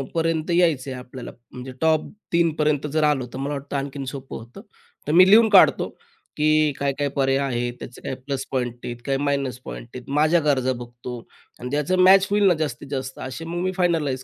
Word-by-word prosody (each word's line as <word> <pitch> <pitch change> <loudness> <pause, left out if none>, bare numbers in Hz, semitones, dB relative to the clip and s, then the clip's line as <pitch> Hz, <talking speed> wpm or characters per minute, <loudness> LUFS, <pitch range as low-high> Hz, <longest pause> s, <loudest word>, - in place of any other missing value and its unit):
पर्यंत 165 0 0
यायचं 165 -6 +2
आहे 130 - -6
आपल्याला, 125 0 -9 0.2
म्हणजे 125 +1 -8
टॉप 160 -1 +2 0.3
3पर्यंत 155 -3 +1
जर 155 - +2
आलं, 145 -4 +2
तर - - -6
मला 140 +2 -3
वाटतं 140 0 -6
आणखीन 140 0 -4
सोपं 135 0 -7
होतं. 115 +2 -12 0.5
तर - - 0
मी 185 +2 +7
लिहून 220 +2 +7
काढतो, 195 -3 +5 0.5
की 155 0 +3
काय 140 -1 0
काय 145 - +1
पर्याय 135 -1 +2
आहेत, 120 -1 -2
त्याचे 125 - -10
काही - - -4
प्लस 135 -1 -3
पॉईंट 125 -3 -2
आहेत, 120 - -5
काही 135 -1 0
मायनस 140 -3 -1
पॉईंट 120 - -8
आहेत. 125 +1 -9
माझ्या 155 +4 +3
गरजा 130 -3 +2
बघतो 120 0 -8 0.4
आणि 125 - -6
त्याचं 150 +5 0
मॅच 190 +1 +6
होईल 205 0 +3
ना 180 - +5
जास्तीत-जास्त 135 -3 -5
असे 130 +5 -7
मग 175 +1 -4
मी 185 - 0
फायनलाईज 155 -8 0
140 Hz, 195 wpm, -23 LUFS, 130-160 Hz, 0.5 s, मी